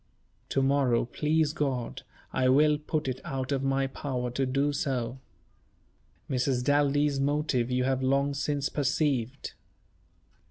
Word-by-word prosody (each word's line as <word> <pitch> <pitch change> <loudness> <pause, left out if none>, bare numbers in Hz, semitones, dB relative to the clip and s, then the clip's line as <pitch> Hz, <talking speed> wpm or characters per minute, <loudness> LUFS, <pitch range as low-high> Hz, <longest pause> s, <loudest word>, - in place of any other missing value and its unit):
To 135 - +1
morrow, 135 -4 +2
please 150 +4 0
God, 135 -7 -2 0.3
I 130 -1 +2
will 150 +3 +4
put 150 -1 -2
it 130 0 -3
out 130 0 -4
of 135 -1 0
my 135 0 +1
power 130 -2 -3
to 130 +2 -1
do 140 +3 +1
so. 130 -3 -2 1.1
Mrs. 125 -1 0
Daldy's 145 0 +2
motive 140 -3 0
you 125 0 +1
have 130 0 0
long 140 +2 +1
since 140 0 -1
perceived. 140 -3 -1
135 Hz, 130 wpm, -28 LUFS, 130-145 Hz, 1.1 s, will